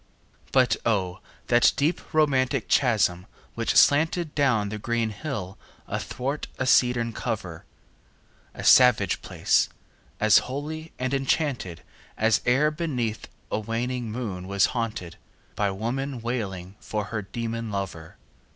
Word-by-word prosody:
But 130 -2 +3
O, 95 -4 0 0.3
that 120 0 +4
deep 155 +5 +1
romantic 140 -4 +2
chasm 105 -8 +2 0.3
which - - -1
slanted 160 +2 +4
Down 125 -8 +2
the 105 +1 -5
green 115 0 -1
hill 100 -5 -5 0.3
athwart 140 +4 -3
a 130 - -1
cedarn 125 -2 +3
cover! 95 -9 -4 0.9
A - - -7
savage 110 -8 +5
place! - - +1 0.5
as 110 -2 +6
holy 155 +4 -5
and 130 +1 -2
enchanted 135 - -1 0.3
As 110 0 +3
e'er 140 +5 +4
beneath 130 -9 -3 0.2
a - - 0
waning 115 +2 -3
moon 100 -6 -5
was 100 0 +3
haunted 110 -8 -4 0.3
15 - - -34
By 100 -1 +1
woman 120 +7 -3
wailing 100 -6 -4
for 105 -1 -3
her 110 - -1
demon 115 +3 -4
lover! 95 -5 -5
115 Hz, 125 wpm, -25 LUFS, 105-135 Hz, 0.9 s, as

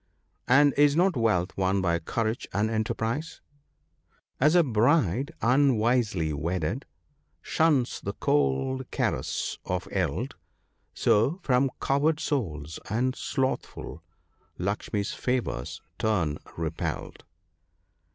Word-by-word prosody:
" - - -45
And 145 +2 +5
is 145 0 +5
not 180 +1 +3
wealth 105 -7 +1
won 95 +1 +1
by 85 -2 +1
courage 110 +7 -2
and 105 +3 +1
enterprise? 115 +7 -2 0.3
— - - -46
*' - - -41
As 150 +5 +5
a 175 - +6
bride, 125 - +2
unwisely 115 - +2
wedded, 85 - -2 0.6
shuns 150 -7 +1
the - - -4
cold 75 - 0
caress - - -2
of 90 0 -3
eld, 95 - -1 0.6
So, 135 - +2
from 130 +1 +3
coward 150 +3 +1
souls 80 - -3
and 125 +4 0
slothful, 130 - -3 0.6
Lakshmi's 100 +2 -2
favours 125 - -2 0.2
turn 90 -9 0 0.2
repelled." 80 -1 -4
115 Hz, 110 wpm, -27 LUFS, 90-135 Hz, 0.6 s, a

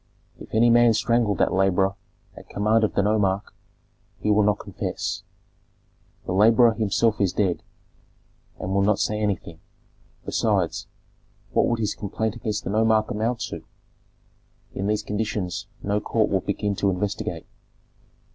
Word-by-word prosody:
If - - -12
any 115 +2 +5
man 120 -1 +5
strangled 115 -2 +1
that - - +2
laborer 95 0 +2 0.4
at - - -13
command 110 +2 +2
of 110 - 0
the 100 - +3
nomarch, 100 -1 0 0.6
he 105 - 0
will 105 +1 +4
not 105 -1 +2
confess; - - -4 1.0
the - - -4
laborer 115 +4 +5
himself 110 0 +1
is 95 -3 +2
dead, 95 -4 0 1.0
and 95 - -3
will 100 - +2
not 100 +1 +3
say 105 0 -1
anything; 95 -5 -2 0.7
besides, - - 0 0.6
what - - +3
would 120 - +1
his 105 -2 -1
complaint 110 +2 -3
against 110 -2 -3
the - - -3
nomarch 110 0 +2
amount 115 +3 -1
to? - - -5 1.1
In 95 - -3
these 105 0 0
conditions 105 -4 -3 0.2
no 100 +1 0
court 110 0 0
would 95 -2 0
begin 100 0 -1
to 100 - +2
investigate." 95 +2 -3
105 Hz, 145 wpm, -24 LUFS, 100-110 Hz, 1.1 s, any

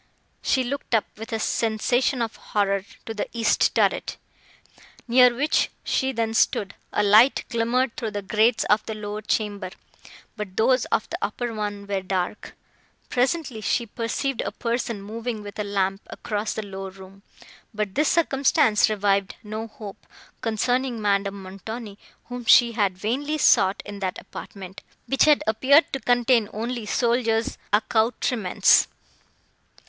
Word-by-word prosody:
She 260 - +1
looked 255 -1 -2
up, 215 - +2
with 225 +3 -9
a 225 - 0
sensation 235 +4 0
of 225 - -5
horror, 200 -1 -1 0.2
to 225 - -5
the 210 - -3
east 230 -2 +2
turret, - - +1 0.9
near 250 +1 +6
which 285 +6 +1
she 265 0 0
then 225 -3 -1
stood; 200 -2 +1 0.2
a 210 - +1
light 215 +6 +5
glimmered 235 +2 0
through 225 - -3
the 205 -1 -5
grates 220 +4 +2
of 210 +1 +2
the 220 - -4
lower 210 0 -5
chamber, 205 -3 -2 0.7
but 205 -3 -7
those 250 +2 +3
of - - -1
the - - -3
upper 235 +3 -3
one 205 -1 -4
were 200 -1 -2
dark. 185 +1 -3 0.5
Presently, 255 -2 -1
she 235 +3 0
perceived 235 +4 -2
a - - -3
person 230 -3 -3
moving 225 +1 -5
with 205 0 -9
a - - 0
lamp 195 -1 -1
across 210 0 -3
the 220 - -4
lower 195 -1 -6
room; 190 +1 -14 0.5
but 210 -2 -3
this 300 +1 +2
circumstance 275 -8 +3
revived 200 -2 0
no 215 +1 -5
hope, 210 -2 -11 0.3
concerning 245 +2 0
Madame 200 -1 0
Montoni, 205 +3 -8 0.3
whom 245 -1 -7
she 235 +1 +6
had 200 -5 0
vainly 275 +10 -2
sought 195 -8 +4
in 205 -1 -8
that 190 -2 -3
apartment, 190 -1 -10 0.2
which 270 - +3
had 300 -1 +4
appeared 260 +8 +4
to 270 - -1
contain 245 -3 +2
only 230 +1 -4
soldiers' 230 -1 0
accoutrements. 220 -1 +3
220 Hz, 145 wpm, -24 LUFS, 205-245 Hz, 0.9 s, near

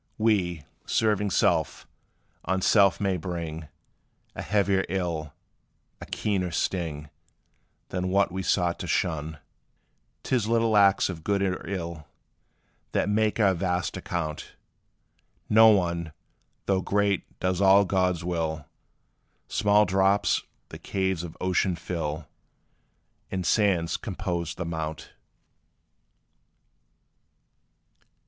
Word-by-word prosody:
We, 95 -8 +1 0.2
serving 105 -2 +1
self, - - +1 0.6
on 95 -1 -1
self 100 -4 +4
may 95 -2 0
bring 80 -2 -5 0.7
A - - -5
heavier 100 +1 +1
ill 85 -5 -2 0.7
a - - -8
keener 95 -4 -1
sting 80 -3 -3 0.8
Than 90 0 -2
what 100 0 +2
we 95 +1 -3
sought 90 -2 0
to - - -5
shun. 80 -3 -1 0.9
'T - - 0
is 110 -3 -2
little 115 -1 +2
acts 100 -1 +5
of 85 -4 -6
good 100 +1 0
or 95 -1 -2
ill, 85 -5 -5 0.9
That - - +1
make 110 +1 +1
our 100 -3 +4
vast 90 -1 -1
account. 80 -3 -4 0.9
No 110 +1 +7
one, 85 -5 +1 0.5
though 95 -1 +1
great, 100 0 -1
does 90 0 0
all 100 +1 +6
God's 90 -2 0
will 80 -4 -2 0.8
Small 105 0 +3
drops 95 +2 +2 0.3
the - - -9
caves 95 -3 -2
of 85 -2 -8
ocean 90 0 +1
fill; 80 -3 -4 1.0
And 95 -2 -3
sands 90 -4 +2
compose 90 -6 -4
the 90 - -4
mount. 80 -1 -5
90 Hz, 110 wpm, -26 LUFS, 85-100 Hz, 1.0 s, No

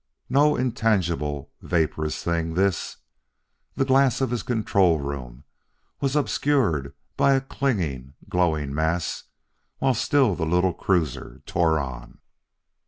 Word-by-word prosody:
No 150 +2 +4
intangible, 90 - -1
vaporous 80 -2 -1
thing, 85 -1 -1
this. 95 0 0 0.8
The 135 - +1
glass 135 -2 +3
of 130 -2 0
his 120 - -1
control 100 - +2
room 70 -3 -6 0.6
was 135 0 -1
obscured 130 - +1 0.2
by 140 - +4
a 135 - +3
clinging, 85 - -2
glowing 80 -6 0
mass 80 +2 -1 0.5
while 135 -1 +2
still 130 -1 +2
the 85 - -3
little 90 +2 +2
cruiser 85 -9 -2
tore 80 -3 +2
on. 65 -3 -7
90 Hz, 115 wpm, -24 LUFS, 75-125 Hz, 0.8 s, No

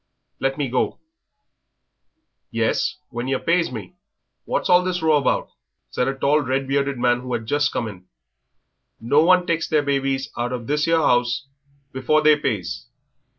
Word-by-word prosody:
Let 135 +1 -1
me 145 -2 -1
go." 125 +1 -1 1.5
"Yes, - - 0 0.2
when 120 0 -4
yer 135 0 +1
pays 170 -1 +1
me." 105 -7 -8 0.5
"What's - - -1
all 180 0 +5
this 180 -2 -2
row 155 -2 +4
about?" 140 - 0 0.4
said 125 - 0
a 135 - -1
tall, 145 +3 +2
red 135 0 -1
bearded 140 0 0
man 120 0 +2
who 125 0 -7
had 110 - -2
just 145 +5 +1
come 115 - -2
in; 95 -4 -10 0.9
"no 140 +7 +3
one 180 +1 +4
takes 165 -2 -1
their 155 -2 +2
babies 135 -1 -1
out 120 +1 -2
of 120 -2 -5
this 150 +4 0
'ere 165 0 +3
'ouse 120 -3 +1 0.5
before 140 +4 +1
they 155 0 +6
pays. 90 - -3
135 Hz, 165 wpm, -22 LUFS, 120-150 Hz, 1.5 s, they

